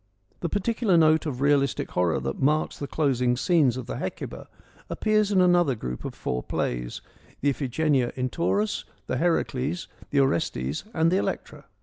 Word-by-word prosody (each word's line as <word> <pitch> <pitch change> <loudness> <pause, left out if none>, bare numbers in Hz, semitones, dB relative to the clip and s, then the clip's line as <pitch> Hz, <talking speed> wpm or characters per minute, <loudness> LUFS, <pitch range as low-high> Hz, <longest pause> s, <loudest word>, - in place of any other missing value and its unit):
The 170 - -2
particular 205 -1 +1
note 160 0 +4
of 130 -3 -4
realistic 140 -2 +2
horror 85 -5 +1
that 65 +1 -4
marks 150 +3 +2
the 140 - -4
closing 125 -5 +1
scenes 140 -5 +3
of 130 - -5
the - - -5
Hecuba - - -5 0.4
appears 215 -1 +1
in 190 -2 +4
another 175 -6 +4
group 60 - -5
of - - -5
four 60 0 -2
plays, - - -3 0.4
the 145 - +3
Iphigenia 135 -1 0
in 130 -1 -1
Tauris, 205 +5 0 0.2
the 130 - -2
Heracles, 160 -1 0 0.2
the 140 - +2
Orestes 75 - 0
and 165 0 +3
the 185 - +3
Electra. - - -3
145 Hz, 160 wpm, -26 LUFS, 125-170 Hz, 0.4 s, note